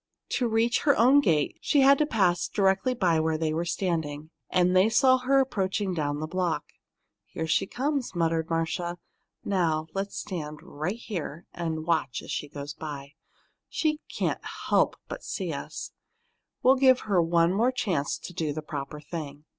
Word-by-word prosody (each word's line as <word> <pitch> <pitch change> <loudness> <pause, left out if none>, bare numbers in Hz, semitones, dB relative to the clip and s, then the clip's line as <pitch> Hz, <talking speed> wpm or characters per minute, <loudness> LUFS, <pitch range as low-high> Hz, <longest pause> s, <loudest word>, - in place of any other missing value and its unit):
To 245 - 0
reach 230 +2 +2
her 285 - +3
own 260 +5 +6
gate, 160 - +1
she 285 - +3
had 275 +1 +6
to 300 - +2
pass 185 - +2
directly 195 +5 +1
by 175 -8 +2
where 160 0 +1
they 155 -1 -1
were 165 +2 -1
standing, 160 -4 -2 0.2
and 180 0 +3
they 185 +4 +5
saw 260 +2 +5
her 270 +2 +3
approaching 200 -6 0
down 145 -3 -1
the 155 - -2
block. 175 +1 -1 0.6
"Here 160 - -4
she 165 +3 +1
comes," 270 -3 -2
muttered 165 -1 0
Marcia. 170 +1 -1 0.5
"Now, 165 -5 +1
let's 195 +1 -3
stand 155 -5 -5
right 180 +4 -4
here 175 -8 -6
and 160 -2 -3
watch 160 -6 0
her - - -12
as - - -7
she 145 - -3
goes 145 0 -6
by. 145 -2 -7 0.6
She 305 -1 0
can't - - -1 0.3
help - - +3
but - - -7
see - - -3
us. - - -6 0.7
We'll 260 +1 +6
give 260 -1 +5
her 195 -5 +2
one 170 +1 +3
more 235 +6 +3
chance 180 - -1
to 180 - -9
do 155 -3 -2
the 155 +1 -5
proper 145 0 -6
thing." 150 -1 -7
175 Hz, 175 wpm, -27 LUFS, 155-225 Hz, 0.7 s, own